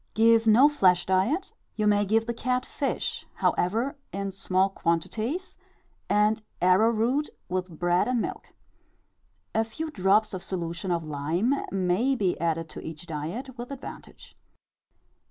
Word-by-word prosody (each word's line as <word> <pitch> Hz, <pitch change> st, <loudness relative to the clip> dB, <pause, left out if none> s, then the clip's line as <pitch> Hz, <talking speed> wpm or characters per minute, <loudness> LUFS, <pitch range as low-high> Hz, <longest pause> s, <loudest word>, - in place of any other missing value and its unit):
Give 225 Hz, 0 st, +5 dB
no 235 Hz, +6 st, +7 dB
flesh 185 Hz, -12 st, +3 dB
diet; 195 Hz, -, +1 dB, 0.2 s
you 215 Hz, -, 0 dB
may 205 Hz, 0 st, +3 dB
give 220 Hz, +3 st, +2 dB
the 235 Hz, -, -2 dB
cat 250 Hz, +2 st, -1 dB
fish, 280 Hz, -, -3 dB
however, 230 Hz, -, 0 dB, 0.2 s
in 195 Hz, 0 st, -3 dB
small 190 Hz, 0 st, +1 dB
quantities, 215 Hz, -, -2 dB, 0.5 s
and 210 Hz, +1 st, +3 dB, 0.2 s
arrowroot 225 Hz, +9 st, +3 dB, 0.2 s
with 180 Hz, -2 st, -3 dB
bread 175 Hz, +1 st, +2 dB
and 250 Hz, -1 st, +1 dB
milk. -, -, -5 dB, 1.0 s
A 225 Hz, -, +2 dB
few 310 Hz, +8 st, -6 dB
drops 210 Hz, 0 st, +2 dB
of 185 Hz, -, -4 dB
solution 170 Hz, 0 st, -4 dB
of 170 Hz, -2 st, 0 dB
lime 155 Hz, -, 0 dB, 0.2 s
may 195 Hz, +8 st, +1 dB
be 195 Hz, -7 st, +1 dB
added 165 Hz, -1 st, 0 dB
to -, -, -8 dB
each 160 Hz, +1 st, -8 dB
diet 180 Hz, -, -5 dB
with 240 Hz, -, -6 dB
advantage. 275 Hz, -1 st, -10 dB
205 Hz, 135 wpm, -27 LUFS, 180-235 Hz, 1.0 s, no